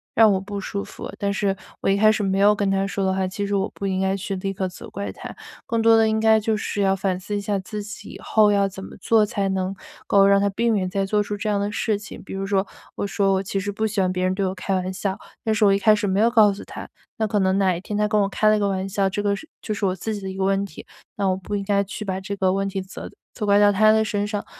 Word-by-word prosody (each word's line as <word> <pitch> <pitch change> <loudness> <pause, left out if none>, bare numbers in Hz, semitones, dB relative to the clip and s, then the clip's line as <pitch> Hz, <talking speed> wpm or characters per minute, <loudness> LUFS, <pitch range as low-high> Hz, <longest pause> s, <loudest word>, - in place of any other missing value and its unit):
让 220 -1 +6
我 190 - +1
不 200 +1 -6
舒 200 +1 -4
服， - - -8
但 200 0 -1
是 195 -1 0 0.2
我 - - +1
一 195 - +3
开 215 +1 +6
始 215 - -1
没 195 -1 0
有 205 +1 +5
跟 205 -1 0
他 195 0 +1
说 200 0 -2
的 190 - +2
话， 190 0 0
其 200 +2 -3
实 205 - -1
我 195 +1 +1
不 200 - -4
应 190 0 -1
该 190 0 +1
去 195 0 -4
立 195 +1 -3
刻 190 0 -2
责 180 - -11
怪 200 +1 -4
他。 - - -9 0.3
更 230 -1 0
多 225 0 +6
的 225 - +4
应 220 0 +1
该 220 0 +5
就 220 +1 0
是 210 -1 -3
要 195 0 +3
反 190 -1 -1
思 205 +2 -5
一 205 - -1
下 200 0 -1
自 205 +2 -6
己， 205 0 -9
以 - - -10
后 215 -1 +3
要 200 -1 +3
怎 190 0 -9
么 - - -11
做 220 0 +4
才 200 -1 -2
能 190 0 -2 0.3
够 195 -1 +5
让 200 0 +5
他 200 - +2
避 235 +4 0
免 200 -5 +1
再 195 +2 -1
做 210 +2 +1
出 205 0 -4
这 210 +1 -3
样 205 -1 +1
的 205 +1 -1
事 210 0 0
情。 210 - -10
比 - - -9
如 195 - -3
说， 195 0 0 0.3
我 200 - -3
说 195 -1 +1
我 190 - +1
其 195 0 -3
实 205 +1 -3
不 220 +2 -1
喜 210 -1 -3
欢 185 -1 +1
别 185 0 -1
人 185 0 +1
对 195 - 0
我 185 - -1
开 190 +1 -2
玩 185 0 -2
笑， 190 +1 -2 0.3
但 220 -1 +1
是 215 - +3
我 195 - +5
一 195 - +1
开 215 +1 +5
始 210 0 -2
没 195 0 +1
有 225 +2 +5
告 215 -4 +5
诉 195 - -9
他， - - -9 0.3
那 220 - +1
可 210 -1 0
能 190 0 +2
哪 190 -2 +2
一 170 - -6
天 205 +1 -4
他 210 - +2
跟 210 -1 +2
我 195 - +1
开 215 +2 +1
了 215 0 +4
个 200 - +1
玩 190 0 -2
笑， 195 0 0
这 205 +2 -3
个 200 0 +1
是 315 - -11
就 215 - -2
是 205 - -6
我 185 -2 +1
自 220 +4 -4
己 205 - -5
的 190 - -5
一 190 - -7
个 190 - -1
问 195 +1 +1
题。 200 - -9 0.3
那 200 - -1
我 185 -1 +2
不 190 +2 -5
应 200 - -2
该 200 0 +1
去 210 +2 -6
把 190 -1 -2
这 200 +1 -4
个 190 -1 +1
问 195 0 -1
题， 195 -1 -4
责 190 - -9 0.2
责 210 - -4
怪 200 - +5
到 205 0 +6
他 215 +2 +5
的 220 0 +3
身 205 -1 -1
上。 205 -1 -3
200 Hz, 340 characters per minute, -23 LUFS, 195-210 Hz, 0.3 s, 让